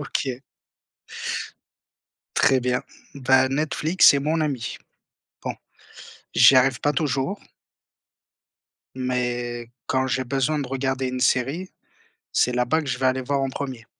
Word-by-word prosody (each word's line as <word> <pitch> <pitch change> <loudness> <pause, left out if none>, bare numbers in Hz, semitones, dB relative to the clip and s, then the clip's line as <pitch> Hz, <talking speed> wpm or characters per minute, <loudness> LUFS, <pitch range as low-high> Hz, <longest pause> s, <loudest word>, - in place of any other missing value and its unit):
OK. 135 -2 -3 1.9
Très 135 - +4
bien, 125 0 -1 0.3
bah, 130 -1 +3
Netflix 155 +5 +3
c'est 140 - +7
mon 155 +4 0
ami. 140 -6 -2 0.7
Bon - - -3 0.8
j'y 135 - +7
arrive 130 -1 +3
pas 145 - +1
toujours 150 +5 -1 1.6
mais 120 -2 -3 0.2
quand 130 0 +1
j'ai 130 0 0
besoin 135 +4 0
de 140 - -3
regarder 130 0 -1
une 130 0 -3
série, 140 +11 +1 0.6
c'est 125 - +2
là-bas 125 +6 +1
que 145 - -7
je 125 - -2
vais 130 - +1
aller 130 0 +1
voir 140 +2 -1
en 135 - 0
premier. 130 -4 -6
130 Hz, 130 wpm, -24 LUFS, 125-140 Hz, 1.9 s, c'est